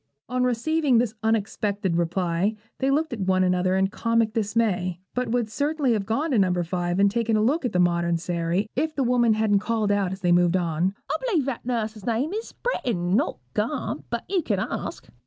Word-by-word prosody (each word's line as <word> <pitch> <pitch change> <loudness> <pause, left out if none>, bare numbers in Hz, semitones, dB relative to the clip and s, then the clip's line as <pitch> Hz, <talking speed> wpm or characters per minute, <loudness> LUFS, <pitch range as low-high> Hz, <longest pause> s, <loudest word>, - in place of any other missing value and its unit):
On 250 0 0
receiving 255 +3 +2
this 230 -2 +1
unexpected 205 -4 0
reply, 175 +3 0 0.2
they 270 - +1
looked 305 +1 +1
at 230 - -5
one 185 -1 +2
another 180 0 +2
in 190 0 +2
comic 230 0 +1
dismay; 205 -5 0
but 250 0 -1
would 240 -1 +1
certainly 285 +2 0
have 200 -3 -2
gone 290 +8 0
to 240 - +3
No. 185 -2 +3
5, 175 +1 -2
and 200 0 +4
taken 225 0 +1
a 215 - +2
look 280 +6 +1
at 245 - 0
the - - 0
modern 170 -1 +2
Sairy, 170 +3 -1
if 310 +3 -1
the 275 - +1
woman 240 -2 +3
hadn't 215 -2 +2
called 215 -1 0
out 200 -3 +1
as 190 0 -6
they 175 -1 +2
moved 175 +1 +4
on 175 +2 0 0.2
'I - - +1
b'lieve 370 - +1
that 255 -3 -4
nuss's 220 -4 -2
name 245 - 0
is 445 +2 -4
Britiain, 195 - -1
not 285 +8 +1 0.2
Gamp; - - -2
but - - -3
you 385 -3 +1
can - - -1
ask.' - - -4
215 Hz, 205 wpm, -25 LUFS, 185-250 Hz, 0.2 s, and